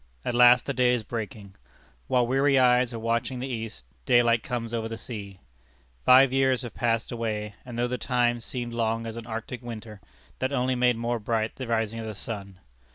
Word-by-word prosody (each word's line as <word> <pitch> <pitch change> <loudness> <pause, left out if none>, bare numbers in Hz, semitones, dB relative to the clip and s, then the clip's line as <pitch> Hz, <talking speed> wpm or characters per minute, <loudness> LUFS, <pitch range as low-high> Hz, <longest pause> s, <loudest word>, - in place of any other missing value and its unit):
At - - -1
last 125 +1 +6
the 140 - -2
day 125 -1 +3
is 115 - -3
breaking. 105 -2 -6 0.5
While 125 -1 +3
weary 135 +3 +3
eyes 125 -1 +4
are 115 - -5
watching 115 +3 -1
the 125 - -4
East, 115 - -6 0.2
daylight 120 -1 +4
comes 120 -2 -4
over 115 -1 -1
the 115 - -5
sea. 100 -5 -8 0.6
Five 130 +1 +7
years 130 -1 +2
have 120 - -7
passed 115 -1 0
away, 110 -3 -3
and 120 -2 -8
though 120 +1 +1
the 125 0 -3
time 120 -2 +1
seemed 120 0 -5
long 115 0 -1
as 115 -1 -5
an 115 -1 -8
Arctic 115 +2 -5
winter, 110 -4 -8 0.4
that 130 +1 -1
only 130 -1 +1
made 125 -1 +2
more 120 +1 -1
bright 110 0 -1
the 130 - -5
rising 115 -1 -1
of 110 - -5
the 110 - -6
sun. 100 -2 -7
115 Hz, 200 wpm, -26 LUFS, 110-125 Hz, 0.6 s, Five